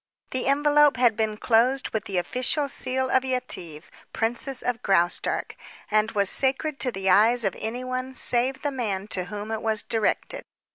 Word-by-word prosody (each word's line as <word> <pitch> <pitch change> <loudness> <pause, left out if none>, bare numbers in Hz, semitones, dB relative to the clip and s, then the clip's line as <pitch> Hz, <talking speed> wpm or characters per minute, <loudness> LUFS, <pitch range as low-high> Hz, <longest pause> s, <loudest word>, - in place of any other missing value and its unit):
The 255 0 -2
envelope 290 0 +4
had 240 -3 +3
been 215 -1 -1
closed 245 +4 +2
with 220 -2 -3
the 195 - -3
official 255 - 0
seal 260 0 -1
of 260 - +3
Yetive, 215 -12 -4 0.2
Princess 240 +4 -1
of 245 -2 -2
Graustark, 175 -3 0 0.4
and 215 +1 +2
was 200 -2 +2
sacred 275 +6 0
to 250 - 0
the 195 -3 -4
eyes 225 +5 +4
of 195 -3 -1
anyone 255 +3 -4
save 255 +3 +2
the 290 - -1
man 210 -7 -3
to 185 -2 -2
whom 210 +3 -6
it 220 - -3
was 220 -2 0
directed. 225 -2 -1
240 Hz, 170 wpm, -25 LUFS, 210-260 Hz, 0.4 s, envelope